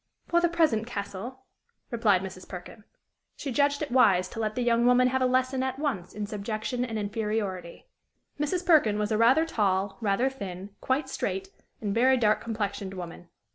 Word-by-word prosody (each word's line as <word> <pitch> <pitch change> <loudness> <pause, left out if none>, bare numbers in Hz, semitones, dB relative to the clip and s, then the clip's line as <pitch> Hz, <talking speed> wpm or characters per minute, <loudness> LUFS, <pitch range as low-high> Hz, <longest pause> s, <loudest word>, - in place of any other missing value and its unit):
"For 345 0 +3
the 345 - +3
present, 310 -10 +2
Castle," 220 +3 -6 0.5
replied 210 -6 +2
Mrs. 185 -1 -9
Perkin. 190 +4 -9 0.5
She 275 - -5
judged 285 +3 +2
it 290 - -5
wise 190 -8 +4
to 225 - -8
let 215 -1 -1
the 250 - 0
young 235 0 +3
woman 250 0 +5
have 260 +1 0
a 255 - +4
lesson 255 +1 +1
at 260 0 -2
once 250 - -3
in 210 0 -3
subjection 215 +4 -3
and 225 -3 -3
inferiority. 205 -4 -3 0.5
Mrs. 345 +5 -1
Perkin 285 - +4
was 210 +1 -1
a 215 - +2
rather 260 +8 +5
tall, 195 -7 0
rather 215 +4 +2
thin, 200 -7 -6
quite 265 +3 0
straight, 385 0 -3 0.3
and 205 -2 -1
very 255 +4 +4
dark 215 -3 +2
complexioned 205 -3 -3
woman. 175 -1 -8
225 Hz, 175 wpm, -27 LUFS, 200-260 Hz, 0.5 s, woman